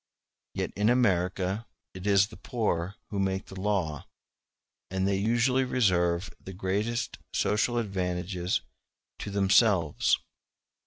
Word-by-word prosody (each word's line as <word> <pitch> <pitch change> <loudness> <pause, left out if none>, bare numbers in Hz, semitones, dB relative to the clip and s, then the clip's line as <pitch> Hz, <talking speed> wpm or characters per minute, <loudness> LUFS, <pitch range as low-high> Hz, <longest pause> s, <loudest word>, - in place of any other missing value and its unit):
Yet - - -2
in 105 +2 +2
America 95 -3 +1 0.3
it 95 +2 -6
is 100 0 +4
the - - -10
poor 100 -6 -2 0.2
who 100 - -2
make 95 0 0
the 95 -1 -9
law, 95 -8 -1 0.8
and 95 +1 0
they 100 -1 +1
usually 120 +5 +2
reserve 90 -8 +1
the 95 - -8
greatest 100 +6 -2 0.2
social 120 +3 +1
advantages 90 -3 -1 0.6
to - - -5
themselves. 100 -4 +3
100 Hz, 115 wpm, -28 LUFS, 90-110 Hz, 0.8 s, is